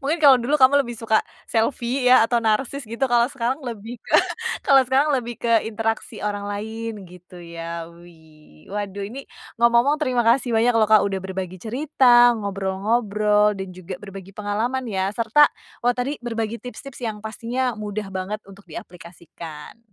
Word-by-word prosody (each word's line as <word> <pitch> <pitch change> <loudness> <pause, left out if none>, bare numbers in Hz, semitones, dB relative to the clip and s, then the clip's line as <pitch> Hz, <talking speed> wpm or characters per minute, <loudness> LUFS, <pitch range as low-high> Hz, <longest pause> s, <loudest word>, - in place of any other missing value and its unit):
Mungkin 300 +5 0
kalau 275 -3 +8
dulu 255 +5 0
kamu 275 +1 +6
lebih 240 0 -7
suka 220 -1 +2 0.3
selfie 245 +2 0
ya 250 -2 +7
atau 240 +1 +1
narsis 240 +6 0
gitu, 230 +4 -1
kalau 240 -1 +4
sekarang 260 +2 -2
lebih 230 0 -7
ke - - -4 0.5
kalau 270 -1 +6
sekarang 275 +4 +2
lebih 240 -2 -3
ke 230 -2 +3
interaksi 225 0 -3
orang 205 -1 -3
lain 220 +1 -5
gitu 180 0 -14
ya, 170 0 -6
wih. 160 - -19
Waduh 200 -1 -4
ini, 260 +6 -9 0.3
ngomong-ngomong 235 +5 +4
terima 255 -5 +1
kasih 240 0 +3
banyak 235 +2 +3
loh 220 -1 +4
Kak, 215 -1 +7
udah 195 -1 -2
berbagi 185 -1 -5
cerita, 245 -1 +4
ngobrol-ngobrol, 210 +1 +1
dan 190 0 -5
juga 185 0 -8
berbagi 195 -2 -10
pengalaman 215 +5 -2
ya, 195 -2 -1
serta 230 +7 +5 0.4
wah 245 +1 +2
tadi 270 +4 -2
berbagi 230 -1 -3
tips-tips 250 +1 -9
yang 215 -2 -4
pastinya 235 +3 -2
mudah 210 -1 -5
banget 190 +3 -4
untuk 200 0 -15
diaplikasikan. 170 0 -11
225 Hz, 160 wpm, -22 LUFS, 195-245 Hz, 0.5 s, kalau